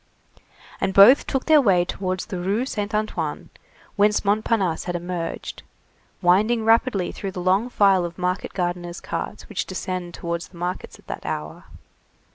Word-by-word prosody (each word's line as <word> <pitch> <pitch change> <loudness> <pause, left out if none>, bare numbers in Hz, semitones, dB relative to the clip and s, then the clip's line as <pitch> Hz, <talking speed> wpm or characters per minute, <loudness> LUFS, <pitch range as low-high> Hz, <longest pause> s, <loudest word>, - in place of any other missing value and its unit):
And 190 - -1
both 220 +8 +8
took 270 - -1
their 310 -2 +6
way 185 -7 +3
towards 185 0 -3
the 190 -5 -5
Rue 200 +7 0
Saint 210 -4 -3
Antoine, 215 0 -3 0.4
whence 210 0 +2
Montparnasse 200 -4 +1
had 175 - -3
emerged, 175 -1 -5 0.6
winding 215 +6 +3
rapidly 225 -4 +2
through 195 -2 -6
the 185 - -5
long 190 +6 +2
file 195 -5 +4
of 170 -1 -6
market 180 +1 -2
gardeners' 175 -1 -3
carts - - -5
which - - -3
descend 180 -2 -4
towards 170 0 -4
the 175 - -17
markets 180 +2 -4
at - - -22
that - - -6
hour. 75 +1 -5
190 Hz, 155 wpm, -23 LUFS, 175-215 Hz, 0.6 s, both